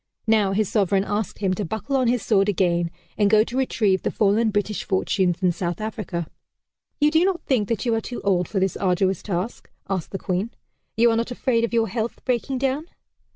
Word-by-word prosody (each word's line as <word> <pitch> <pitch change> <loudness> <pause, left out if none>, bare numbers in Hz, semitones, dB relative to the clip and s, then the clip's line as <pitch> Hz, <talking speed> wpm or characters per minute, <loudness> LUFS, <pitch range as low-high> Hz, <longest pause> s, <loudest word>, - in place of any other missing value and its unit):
Now 215 -3 +3
his 215 +1 +1
sovereign 195 -2 +2
asked 205 -1 -3
him 190 -1 +2
to 205 - -2
buckle 220 - -3
on 260 -2 +2
his 240 -2 +1
sword 200 -2 +3
again, 175 -3 +1 0.3
and 205 -1 +4
go 215 0 +5
to 235 - -7
retrieve 215 -7 +1
the - - -1
fallen 220 +2 +2
British 205 0 -1
fortunes 185 -2 0
in 180 - +4
South 175 0 -3
Africa. 210 -5 -4 0.7
"You 300 0 +4
do 320 +2 +4
not 375 -2 0
think 230 -7 +1
that 230 +1 -1
you 235 - +2
are 225 - +1
too 245 - -6
old 180 -4 +2
for 195 - -1
this 190 -1 0
arduous 190 0 +1
task?" 190 +3 -4 0.2
asked 190 -4 -2
the 195 - -4
Queen. 190 +3 -2 0.5
"You 235 +1 +5
are - - +1
not 230 +1 -1
afraid 245 -1 0
of 235 - 0
your 230 -1 +2
health 230 0 -4
breaking 255 +1 0
down?" 270 +4 -1
210 Hz, 210 wpm, -23 LUFS, 190-235 Hz, 0.7 s, go